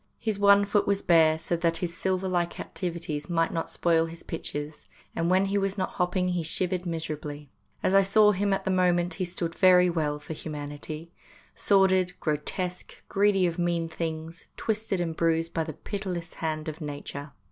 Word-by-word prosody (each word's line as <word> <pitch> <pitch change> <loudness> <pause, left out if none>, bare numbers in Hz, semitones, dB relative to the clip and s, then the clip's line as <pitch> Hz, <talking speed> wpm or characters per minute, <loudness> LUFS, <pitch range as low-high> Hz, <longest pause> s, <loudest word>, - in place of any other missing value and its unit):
His 215 -3 -2
one 200 0 +6
foot 205 0 +1
was 200 0 +1
bare 160 -2 +5
so 165 +2 -1
that 165 0 +1
his 170 -2 -3
Silver 190 +1 -1
like 175 -2 -1
activities 165 -4 -4
might 165 -1 +1
not 165 - -2
spoil 165 -1 +2
his 165 +1 -10
pictures, 150 -2 -5 0.3
and 165 +1 0
when 185 +2 +4
he 200 +1 +1
was 195 +1 -1
not 185 - -1
hopping 180 0 0
he 180 -1 0
shivered 180 +2 -1
miserably. 150 -3 -5 0.3
As 185 - +2
I 195 - +7
saw 210 +2 +5
him 200 +1 0
at 195 - 0
the 190 - +1
moment 180 -1 +2
he 185 - -2
stood 170 -1 -4
very 180 -1 +5
well 150 -3 -1
for 150 +2 -7
humanity 150 +1 -7 0.4
sordid, 190 -2 +3
grotesque, 175 +4 -4
greedy 195 -2 +3
of 170 0 -1
mean 170 -1 0
things, 160 +1 -5
twisted 215 -3 -1
and 165 -2 -2
bruised 165 0 +1
by 165 - 0
the 155 -1 -6
pitiless 180 -2 -5
hand 155 -1 -3
of 155 +2 -6
Nature. 145 -1 -6
175 Hz, 180 wpm, -27 LUFS, 160-185 Hz, 0.4 s, I